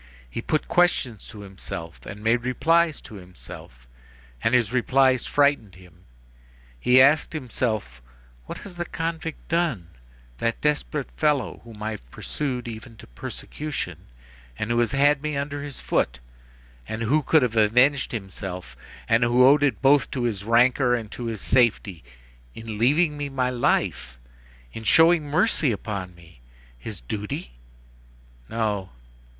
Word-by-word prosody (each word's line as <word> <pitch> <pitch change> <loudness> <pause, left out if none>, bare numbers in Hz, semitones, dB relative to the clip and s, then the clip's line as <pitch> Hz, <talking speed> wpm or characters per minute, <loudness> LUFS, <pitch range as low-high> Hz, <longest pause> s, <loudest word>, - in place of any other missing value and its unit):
He 90 - -5
put 155 +5 -1
questions 145 - +1
to 110 -3 -10
himself, 95 -4 -8
and 105 0 -8
made 115 +2 +2
replies 155 +6 +2
to 110 - -11
himself, 65 -8 -12 0.6
and 120 - +3
his 120 -2 +2
replies 130 0 +3
frightened 140 -10 +2
him. 90 -2 -18 0.7
He 125 - +5
asked 140 +4 +5
himself: 110 - -3 0.5
"What - - -6
has 185 -4 -10
that 175 -1 -5
convict 165 -1 -4
done, 155 - -1 0.5
that 115 0 -1
desperate 150 -1 -1
fellow, 145 -7 0
whom 110 -2 -11
I 110 - -2
have - - -9
pursued 125 - -4
even 115 +1 -8
to - - -12
persecution, 145 - -6 0.5
and 105 - -2
who 120 - +2
has 120 - +2
had 140 +1 +3
me 150 -1 -2
under 145 +1 -3
his 140 -2 -7
foot, 60 +1 0 0.7
and 110 +1 -4
who 145 +7 +2
could 150 +1 +3
have 120 -2 -1
avenged 125 +6 +3
himself, 95 - -6 0.3
and 115 +1 +3
who 120 +2 +5
owed 140 +2 +6
it 140 -5 +1
both 140 +1 +4
to 125 - -3
his 105 -5 -2
rancor 125 +3 +3
and 110 -3 -5
to 120 - -6
his 110 -4 -4
safety, 110 - +1 0.5
in 110 -2 -7
leaving 150 +6 +3
me 145 -1 -3
my 130 -2 -1
life, 65 - 0 0.5
in 115 - -7
showing 160 +6 +5
mercy 150 - +2
upon 100 -4 -5
me? 85 -6 -18 0.3
His - - -8
duty? 100 - -5 1.0
No. 105 -4 -2
120 Hz, 145 wpm, -24 LUFS, 105-145 Hz, 1.0 s, owed